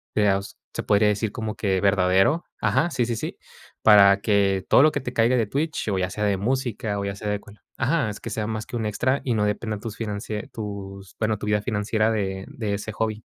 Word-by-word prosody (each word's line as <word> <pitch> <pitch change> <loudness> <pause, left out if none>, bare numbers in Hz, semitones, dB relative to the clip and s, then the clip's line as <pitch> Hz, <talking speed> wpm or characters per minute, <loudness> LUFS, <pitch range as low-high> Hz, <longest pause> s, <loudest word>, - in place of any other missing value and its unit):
de 105 -1 +4
aus 100 0 -2 0.2
se - - -3
podría 105 +1 +4
decir 105 +1 -1
como 110 -1 -4
que 95 -3 0
verdadero. 95 - +3
Ajá, 170 - +2
sí, 125 -7 0
sí, 120 - -2
sí, 110 - -5 0.5
para 100 -2 +7
que 100 -3 +2
todo - - +6
lo 155 +1 +6
que 145 - -2
te 125 -1 -5
caiga 115 +2 +3
de 115 - +2
Twitch, 150 +2 -2
o 95 -2 0
ya 90 0 0
sea 105 +2 -4
de 100 -2 +2
música, 115 -2 -1
o 100 - -2
ya 100 - -3
sea 105 - -6
de 105 - -1
cual 100 0 -16 0.2
Ajá, 135 -2 +1
es 105 +1 -7
que 115 - -6
sea 105 0 -2
más 110 -1 -3
que 120 - -5
un 110 - -2
extra 130 +6 0
y 125 - +1
no 105 - +1
dependa 105 0 -2
tus 110 -2 -6
financie 105 -1 -4
tus, 100 -3 -7
bueno, 110 -1 +1
tu 105 - -6
vida 105 0 +1
financiera, 110 0 0
de 95 -3 -2
de 105 -4 -3
ese 105 +1 -6
hobby. 110 0 -2
105 Hz, 240 wpm, -24 LUFS, 100-115 Hz, 0.5 s, para